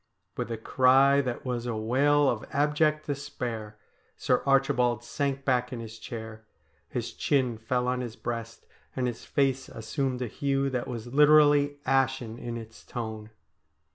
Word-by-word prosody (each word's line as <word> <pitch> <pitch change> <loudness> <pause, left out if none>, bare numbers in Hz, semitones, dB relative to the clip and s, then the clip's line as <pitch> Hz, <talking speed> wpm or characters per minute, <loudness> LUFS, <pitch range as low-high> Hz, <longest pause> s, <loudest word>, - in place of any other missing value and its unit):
With - - -3
a 115 - -2
cry 135 +4 +4
that 125 -2 -4
was 125 -1 -2
a 115 - -2
wail 140 +6 +3
of 120 -2 0
abject 150 +1 +2
despair 125 -7 -5 0.4
Sir - - +1
Archi 135 0 +4
bald 120 -2 +1
sank 140 +2 -2
back 125 -2 +1
in 125 - -5
his 110 -1 -8
chair; 110 -1 -8 0.5
his - - -4
chin 130 -5 +1
fell 125 +2 -1
on 125 0 0
his 120 -2 -6
breast, 115 0 -6 0.3
and 130 - 0
his 120 -2 -4
face 135 -2 0
assumed 125 +3 -3
a - - -3
hue 135 +3 -1
that 125 -2 -2
was 120 0 -6
literally 145 -1 +5
ashen 130 -3 +1
in 120 -1 -5
its 115 -1 -11
tone. 110 -3 -6
125 Hz, 160 wpm, -28 LUFS, 115-140 Hz, 0.5 s, literally